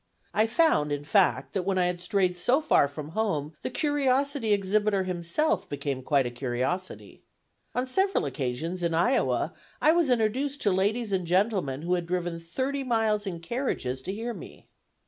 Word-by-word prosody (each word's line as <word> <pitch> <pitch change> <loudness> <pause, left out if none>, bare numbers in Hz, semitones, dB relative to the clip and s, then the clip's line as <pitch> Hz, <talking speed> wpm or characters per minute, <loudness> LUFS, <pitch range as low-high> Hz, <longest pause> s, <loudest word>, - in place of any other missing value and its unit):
I 215 +1 +3
found, 225 - +3
in 145 0 -2
fact, 190 +5 +2
that 195 - 0
when 190 +1 -1
I 180 - +3
had 175 0 -2
strayed 180 0 +1
so 245 - +2
far 305 - +3
from 145 +1 -8
home, 165 -6 -1
the - - -3
curiosity 280 -4 +1
exhibitor 200 0 +2
himself 185 - -1
became 140 -3 -3
quite 140 0 +2
a 120 - -3
curiosity. 130 +9 -3 0.5
On 250 - +1
several 385 - +1
occasions, 140 +6 -3
in 170 -1 0
Iowa, 245 +11 +1 0.3
I 310 - +5
was 335 -3 +2
introduced 255 +5 +1
to 205 - +3
ladies 205 +4 0
and 185 -3 -1
gentlemen 180 - +1
who 175 +2 0
had 175 -2 -1
driven 175 -1 -2
thirty 260 +12 -3
miles 220 -4 +1
in 170 -3 -4
carriages 165 - -2
to 185 - -4
hear 230 +4 -4
me. - - -11
190 Hz, 170 wpm, -27 LUFS, 165-240 Hz, 0.5 s, I